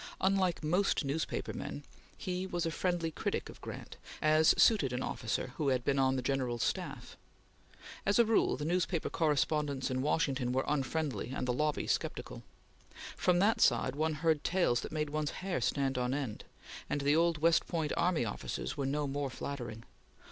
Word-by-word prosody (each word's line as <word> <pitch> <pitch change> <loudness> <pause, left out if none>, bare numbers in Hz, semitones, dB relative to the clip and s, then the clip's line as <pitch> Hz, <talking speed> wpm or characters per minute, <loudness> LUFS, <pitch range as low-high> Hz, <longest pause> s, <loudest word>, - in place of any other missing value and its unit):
Unlike 190 -3 +1
most 175 0 +1
newspaper 145 +4 -2
men, 145 - -6 0.3
he 185 0 -3
was 175 -2 -2
a 165 - 0
friendly 175 -1 -1
critic - - -3
of - - -12
Grant, - - -8 0.2
as 155 +1 +5
suited 150 - +4
an 125 - -2
officer 115 +2 -3
who 150 - 0
had 130 -2 +1
been 140 -1 +2
on 130 0 +3
the 130 - -2
General's 125 -3 0
staff. - - -3 0.9
As 200 - +2
a 235 - +6
rule, 220 -9 +2
the 145 - -4
newspaper 175 0 0
correspondents 150 -3 +1
in 130 0 0
Washington 135 -4 0
were 130 +1 +1
unfriendly, 145 -5 -1
and 125 - -2
the 125 - +1
lobby 150 +3 0
sceptical. - - -2 0.7
From 180 -1 +2
that 205 +5 +3
side 125 +2 +3
one 155 +1 0
heard 155 -1 +1
tales 175 -10 +2
that - - -7
made 150 -2 -2
one's 155 -1 -1 0.2
hair 185 -9 -1
stand 135 +1 0
on 125 +2 0
end, 130 -7 -4 0.4
and 145 - -1
the 145 +2 +3
old 165 0 +3
West 165 +2 +3
Point 160 -4 -1
army 170 -8 +2
officers 65 - -4
were 135 - -2
no 145 +2 0
more 140 0 -2
flattering. 120 -4 -6
150 Hz, 175 wpm, -32 LUFS, 130-165 Hz, 0.9 s, a